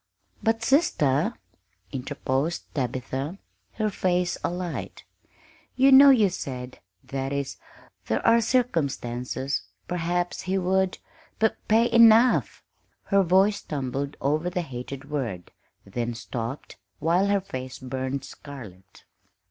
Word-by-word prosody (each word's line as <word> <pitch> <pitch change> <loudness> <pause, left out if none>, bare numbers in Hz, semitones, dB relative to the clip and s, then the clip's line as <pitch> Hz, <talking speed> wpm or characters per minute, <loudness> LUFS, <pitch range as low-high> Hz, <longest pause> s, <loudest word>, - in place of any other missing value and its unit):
"But, 225 0 +1
sister," 155 - +2 0.6
interposed 135 +4 -3
Tabitha, 130 - -3 0.4
her 215 -1 -1
face 180 -2 0
alight, 175 0 -4 0.7
"you 270 +1 +5
know 275 +1 +10
you 230 -7 +6
said 125 -6 -6 0.2
that 135 0 -4
is, 140 -1 -3 0.5
there 110 - -1
are 230 0 +6
circumstances 140 - -1 0.3
perhaps 175 0 -1
he 190 +1 -1
would 190 0 +1 0.4
p 220 - +4 0.2
pay 230 +2 +4
enough 230 +1 +5 0.2
" - - -44
Her 200 0 +5
voice 190 +3 +4
stumbled 140 0 -4
over 155 +5 0
the 180 -1 -2
hated 135 0 -7
word, 115 -12 -3 0.3
then 120 +4 -3
stopped, 120 +2 -6 0.2
while 175 +5 +2
her 200 0 +3
face 130 -9 -7
burned 130 +1 -4
scarlet. 100 -10 -12
155 Hz, 115 wpm, -26 LUFS, 130-195 Hz, 0.7 s, know